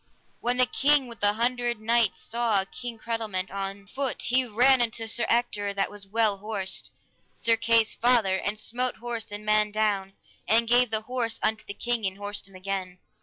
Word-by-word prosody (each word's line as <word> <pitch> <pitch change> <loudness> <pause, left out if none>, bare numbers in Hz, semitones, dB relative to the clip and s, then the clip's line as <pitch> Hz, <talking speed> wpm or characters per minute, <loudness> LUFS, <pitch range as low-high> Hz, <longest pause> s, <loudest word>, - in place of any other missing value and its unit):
When 245 +1 0
the 255 - +5
King 285 +1 +3
with 235 -2 -11
the 205 0 +3
Hundred 240 0 0
Knights 230 -1 +1
saw 225 -4 0
King 240 +3 -7
Cradelment 220 -5 -3
on 195 0 -5
foot, 265 +5 -2
he 255 +1 +2
ran 250 +4 +4
unto 225 -1 -1
Sir 230 +2 +1
Ector, 205 -4 0
that 195 - 0
was 205 -1 -8
well 215 -1 +1
horsed, 200 -2 -3 0.5
Sir 230 -1 +2
Kay's 230 -1 +3
father, 230 -6 +3
and 205 +2 -2
smote 250 +4 0
horse 230 -2 -5
and 205 +1 -6
man 215 0 +3
down, 205 -2 0 0.3
and 225 +4 +3
gave 245 +1 +4
the 220 0 +1
horse 235 0 -2
unto 220 0 0
the 200 - -7
king, 235 -3 -1
and 190 0 -5
horsed 205 0 -4
him 195 - -18
again. 185 -1 -4
220 Hz, 185 wpm, -26 LUFS, 205-240 Hz, 0.5 s, the